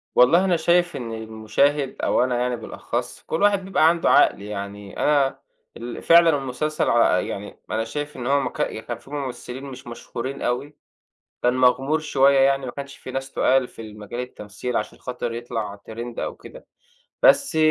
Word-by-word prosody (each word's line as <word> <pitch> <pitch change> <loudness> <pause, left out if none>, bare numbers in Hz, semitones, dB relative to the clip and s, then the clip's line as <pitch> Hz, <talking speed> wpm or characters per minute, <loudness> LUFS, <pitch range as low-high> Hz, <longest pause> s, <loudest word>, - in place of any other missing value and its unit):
والله 170 +10 +6
أنا 175 -3 +2
شايف 175 +2 +2
إن 115 -3 -5
المُشاهد، 110 +6 0
أو - - +3
أنا 125 -1 0
يعني 125 0 0
بالأخص، 120 +1 -5
كل 160 - -2
واحد 200 -2 +3
بيبقى 175 -4 +3
عنده 170 0 +1
عقل - - +5
يعني. 100 -1 -7
أنا 140 -2 +2 0.4
ال 120 +1 -7
فعلًا 170 0 +7
المسلسل 140 +3 -1
على 105 -6 +3
يعني 100 +1 -7
أنا 110 +1 0
شايف 145 +5 -5
إن 120 0 -4
هو 140 +1 +3
مك - - -3 0.3
كان - - -3
فيه 140 - -18
ممثلين 135 -2 -5
مش 130 -3 -9
مشهورين 125 +3 -6
أوي، 140 +5 -2 0.7
كان 125 0 +3
مغمور 130 +4 +3
شوية 140 -2 +3
يعني، 135 0 +3
ما 125 - -4
كانش 140 0 -8
فيه 130 - -9
ناس 135 0 -4
تُقال 130 -1 +2
في - - -12
المجال 105 +2 -8
التمثيل 125 0 -4
عشان 105 - -4
خاطر 120 -2 -4
يطلع 115 -3 -4 0.2
trend 120 +1 -6
أو - - -3
كده. - - -13 0.6
بس 280 - +5
130 Hz, 175 wpm, -23 LUFS, 115-145 Hz, 0.7 s, فعلًا